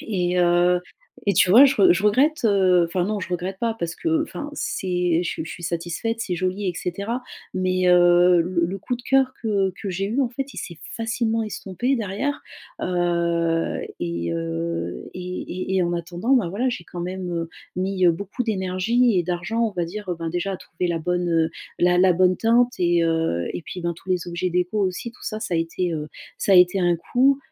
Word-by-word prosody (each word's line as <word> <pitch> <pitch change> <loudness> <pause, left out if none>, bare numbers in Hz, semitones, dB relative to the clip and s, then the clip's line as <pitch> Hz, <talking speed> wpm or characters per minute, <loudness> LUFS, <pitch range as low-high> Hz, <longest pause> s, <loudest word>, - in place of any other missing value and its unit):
Et 180 -4 -1
heu 175 0 +3 0.5
et 200 - +3
tu 180 - +4
vois, 255 +8 +9
je 270 - +1
re 195 -5 +6
je 180 - -1
regrette, 270 +8 +3
heu 185 -4 +4
enfin 175 +1 -1
non, 210 +1 -2
je - - -5
regrette 180 +2 -3
pas 230 -1 0
parce 170 0 -3
que, 325 -2 0
enfin, 295 -2 -6
c'est 180 - 0
je 175 - -3
suis - - -4
je - - -8
suis 175 - -9
satisfaite, 175 +7 -2
c'est 185 - -2
joli, 185 +3 -2
et 175 - -2
cetera. 200 +9 -3 0.3
Mais 185 0 +1
heu, 175 0 +6
le 170 -1 0
le 195 +3 -4
coup 245 - -3
de 245 - -14
cœur 265 0 +2
que 200 -3 +1
que 200 - -4
j'ai 195 +2 -2
eu, 235 +7 0
en 255 - 0
fait, 275 +2 -5
il - - -13
s'est 170 -3 -7 0.2
facilement 225 0 -1
estompé 215 +5 -2
derrière, 230 +7 -2 0.4
heu, 170 -2 0 0.2
et, 85 0 -2
heu, 85 +1 -3
et 180 0 -5 0.3
et - - +2
et 185 - +3
en 175 0 0
attendant 175 +7 -2
ben, 220 -10 +2
voilà 235 +8 -1
j'ai 245 - -5
quand 175 - -8
même, 180 0 -4
heu, 165 -1 -3 0.3
mis, 185 0 +1
heu, - - +7
beaucoup 200 +8 -4
d'énergie 210 +2 +1
et - - +2
d'argent, 180 +6 -2
on 225 - +1
va 175 -2 -1
dire, 200 +4 -7
heu, 175 - -1
ben 165 -1 -3
déjà 175 +3 -2
à 190 - -3
trouver 180 +1 -4
la 170 -1 0
bonne, 180 +2 -1
heu, 165 -1 +2 0.3
la 175 0 +3
la 185 0 +5
bonne 185 +1 +3
teinte 240 +2 +3
et, 175 -1 +3
heu, 160 - 0
et - - -4
puis 180 - -7
ben 170 - 0
dans - - -5
tous 170 - -17
les 180 -2 0
objets 175 +1 -2
déco 180 +4 0
aussi. 195 +5 -2
Tout - - -19
ça 215 0 -4
ça 180 - -3
a - - +2
été, 165 +1 -1
heu 150 -1 -4 0.3
ça 200 - +2
a - - +7
été 180 +1 +5
un 175 -1 +3
coût, 260 +10 +2
180 Hz, 225 wpm, -23 LUFS, 175-215 Hz, 0.5 s, vois